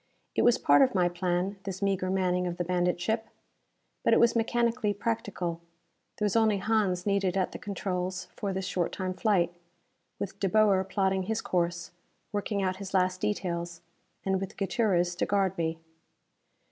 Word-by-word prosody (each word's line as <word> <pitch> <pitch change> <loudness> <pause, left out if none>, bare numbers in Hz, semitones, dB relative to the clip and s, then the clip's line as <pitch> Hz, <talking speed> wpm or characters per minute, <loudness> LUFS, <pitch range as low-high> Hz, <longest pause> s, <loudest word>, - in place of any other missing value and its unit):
It - - +1
was 240 0 +5
part - - +5
of 260 -5 +4
my 180 -1 +4
plan, 180 +2 -1
this 190 -1 -5
meager 195 -2 0
manning 180 -1 +1
of 175 0 -4
the 175 - 0
bandit 180 0 0
ship. 220 +5 -1 0.8
But - - +4
it - - +4
was 235 0 +4
mechanically 230 -1 +1
practical: 190 -6 -2 0.6
there 210 - 0
was 205 - 0
only 220 -2 +4
Hans 200 -3 +1
needed 195 -2 +1
at 185 - 0
the - - -7
controls 185 -2 -3
for 200 - -2
this 190 0 -3
short 180 -2 -1
time 185 -1 -2
flight: 185 -4 +1 0.6
with 200 0 -5
De 195 - +1
Boer 205 -2 +4
plotting 190 -1 0
his 220 0 -1
course, 175 -1 -1 0.4
working 205 -1 -1
out 185 0 0
his 195 -1 -6
last 185 0 +2
details 170 -4 -2 0.4
and 190 -1 +1
with 195 - -6
Gutierrez 185 -3 +1
to - - 0
guard 195 -2 +1
me. 165 -1 -1
190 Hz, 170 wpm, -29 LUFS, 180-205 Hz, 0.8 s, was